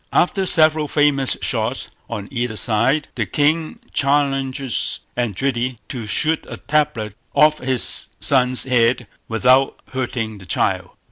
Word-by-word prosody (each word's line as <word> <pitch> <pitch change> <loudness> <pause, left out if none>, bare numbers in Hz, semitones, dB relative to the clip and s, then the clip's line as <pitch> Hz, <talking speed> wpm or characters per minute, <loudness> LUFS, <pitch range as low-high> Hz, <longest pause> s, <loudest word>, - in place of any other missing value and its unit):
After 190 +1 +1
several 155 -3 +5
famous 145 -3 +1
shots 115 +2 -1 0.2
on 105 -4 -5
either 120 -3 -2
side, 120 +7 0
the - - -3
king 155 +2 0 0.2
challenges 135 -2 0
Eindridi 120 +2 -1
to 120 -4 -6
shoot 155 +8 +1
a - - -7
tablet 145 -8 -1 0.2
off 155 0 +4
his 130 -1 +2
son's 130 -2 +3
head 125 -1 +2 0.2
without 125 +4 +2
hurting 120 -5 -3
the 95 - -14
child. - - -1
130 Hz, 125 wpm, -20 LUFS, 120-145 Hz, 0.2 s, several